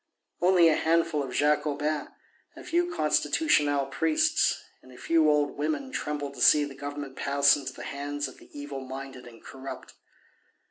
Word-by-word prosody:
Only 180 -1 +5
a 160 - +4
handful 165 -2 +1
of 135 -2 -5
Jacobins, 150 +1 0 0.5
a - - -11
few 350 +1 0
Constitutional 145 - +1
priests 155 +3 +1 0.2
and 130 - -17
a 125 - -14
few 165 -2 +2
old 145 -1 +1
women 155 - -2
trembled 145 - -4
to - - -9
see 150 - +6
the 145 -1 -6
Government 145 0 -7
pass 140 0 +3
into 135 -2 -6
the - - -9
hands 145 +1 -4
of - - -13
the - - -18
evil 145 -1 -7
minded 130 -1 -8
and 115 -1 -15
corrupt. 135 0 -9
145 Hz, 165 wpm, -27 LUFS, 140-155 Hz, 0.5 s, see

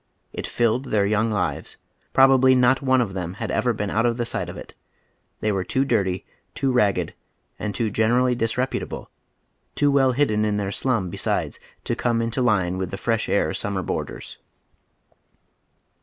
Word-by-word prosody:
It - - -4
filled 120 +2 +1
their 105 -5 +1
young 110 +2 +1
lives. 90 -9 -2 0.3
Probably 130 -1 +6
not 125 +1 +4
one 130 -2 +3
of 105 -5 -2
them 90 -1 -4
had - - -4
ever 120 +2 +1
been 105 -3 -3
out 115 +3 +2
of 120 0 0
the 120 - -1
sight - - -3
of - - -8
it. - - -10 0.7
They 110 - +1
were 95 -2 -1
too 130 +9 0
dirty, 95 -7 0 0.3
too 135 - 0
ragged, 100 -8 +1 0.5
and 105 -2 -3
too 110 -1 -1
gen 110 +2 +2
ei'ally 125 +1 +3
disreputable, 120 +3 -2 0.6
too 145 -1 +3
well 135 -2 +3
hidden 115 -6 +1
in 105 -1 0
their 100 -1 -2
slum 110 -7 -1
besides, - - -2 0.2
to - - -2
come 120 -1 0
into 115 +2 -1
line 95 -7 +1
with 95 -1 -3
tlie 95 - -4
Fresh 115 +2 -1
Air 80 -6 +1
summer 100 -2 -2
boai - - -2
ders. - - -10
115 Hz, 180 wpm, -23 LUFS, 100-125 Hz, 0.7 s, Probably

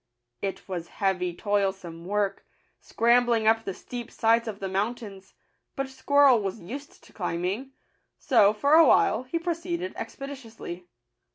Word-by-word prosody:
It 195 -1 -4
was 175 -3 -5
heavy 185 -3 -1
toilsome 190 -5 -2
work, 205 +1 -1 0.4
scrambling 235 -1 +2
up 225 0 +4
the 195 - -3
steep 240 -1 -7
sides 230 0 +2
of 210 -2 -5
the 195 - -3
mountains; 195 0 -4 0.4
but 270 -1 -3
Squirrel 265 -2 +4
was 195 +2 -4
used 275 +11 -9
to - - -19
climbing; 190 +8 -3 0.4
so, 230 -8 +4
for 280 +8 +1
a 325 -1 +8
while, - - +4
he 295 +7 -2
proceeded 345 +1 -3
expeditiously. 230 -10 -8
225 Hz, 135 wpm, -27 LUFS, 195-265 Hz, 0.4 s, a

